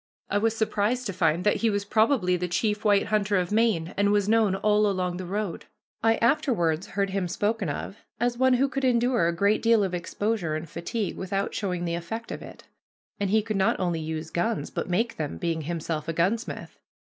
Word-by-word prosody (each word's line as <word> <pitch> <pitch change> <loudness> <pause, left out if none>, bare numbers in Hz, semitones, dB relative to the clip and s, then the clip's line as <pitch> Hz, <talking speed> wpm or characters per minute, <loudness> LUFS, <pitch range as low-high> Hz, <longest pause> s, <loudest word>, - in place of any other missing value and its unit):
I 205 - +2
was 225 +1 +1
surprised 220 +3 0
to 200 - -3
find 170 -1 +1
that 210 - +3
he 230 - +2
was 205 -1 -1
probably 215 -3 +2
the 180 0 -2
chief 210 +4 -1
white 205 -2 +4
hunter 210 -2 +2
of 180 0 -1
Maine 210 -7 +1
and 200 0 +2
was 205 -1 +2
known 215 -3 +3
all 210 +1 +3
along 180 -2 -1
the 185 -1 -6
road. 200 -2 -3 0.4
I 225 0 +4
afterwards 205 - +1
heard 195 -1 -1
him 190 -2 -1
spoken 205 0 -1
of 170 +7 -5 0.2
as 240 +1 +1
one 260 +1 +4
who 270 +3 +3
could 275 0 -3
endure 245 -7 +3
a - - +2
great 200 +4 +2
deal 230 -2 +4
of 190 -2 -2
exposure 180 -1 -2
and 155 +2 -5
fatigue 185 +7 -4
without 195 +1 -2
showing 180 -3 -2
the 170 - -2
effect 175 +8 -5
of - - -5
it; - - -11 0.6
and 200 -1 0
he 215 +1 +3
could 215 -2 -2
not 190 - +2
only 175 -3 0
use 160 0 -5
guns, 215 +6 -1
but - - -4
make 225 +7 0
them, 150 -2 -3
being 165 -2 -1
himself 160 -1 -3
a 165 - -1
gunsmith. 195 +9 -2
200 Hz, 210 wpm, -26 LUFS, 175-225 Hz, 0.6 s, white